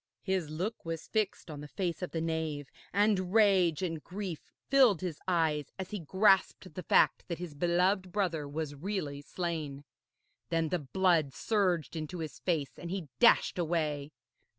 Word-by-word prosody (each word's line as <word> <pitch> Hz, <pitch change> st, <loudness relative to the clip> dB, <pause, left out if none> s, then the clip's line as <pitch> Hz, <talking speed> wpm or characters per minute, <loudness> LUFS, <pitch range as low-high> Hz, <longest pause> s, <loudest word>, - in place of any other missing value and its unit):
His 190 Hz, -5 st, -1 dB
look 185 Hz, +9 st, -3 dB
was 165 Hz, -1 st, -5 dB
fixed 210 Hz, -6 st, -1 dB
on 145 Hz, -1 st, -7 dB
the 150 Hz, -, -8 dB
face 175 Hz, +1 st, -3 dB
of 180 Hz, -, -3 dB
the 165 Hz, -, -3 dB
knave, 160 Hz, -3 st, -2 dB, 0.2 s
and 200 Hz, -3 st, +2 dB
rage 190 Hz, -6 st, +4 dB
and 165 Hz, -4 st, -3 dB
grief 185 Hz, -4 st, -6 dB, 0.2 s
filled 255 Hz, -, +5 dB
his 175 Hz, -5 st, -4 dB
eyes 160 Hz, -5 st, +1 dB
as 190 Hz, -1 st, -6 dB
he 210 Hz, -, -3 dB
grasped 190 Hz, +2 st, +2 dB
the 185 Hz, -, -5 dB
fact -, -, +3 dB
that 170 Hz, -, -3 dB
his 175 Hz, -3 st, -6 dB
beloved 180 Hz, +4 st, +1 dB
brother 170 Hz, -7 st, -1 dB
was 150 Hz, 0 st, -3 dB
really 145 Hz, -3 st, -4 dB
slain. 155 Hz, -4 st, -4 dB, 0.7 s
Then 165 Hz, -1 st, +1 dB
the 180 Hz, -, 0 dB
blood 160 Hz, -1 st, +2 dB
surged 185 Hz, -8 st, 0 dB
into 160 Hz, +2 st, -4 dB
his 155 Hz, -4 st, -6 dB
face, 160 Hz, -6 st, -1 dB
and 170 Hz, -, -6 dB
he 180 Hz, -5 st, -4 dB
dashed -, -, +5 dB
away. 155 Hz, -4 st, -1 dB
170 Hz, 165 wpm, -31 LUFS, 155-190 Hz, 0.7 s, filled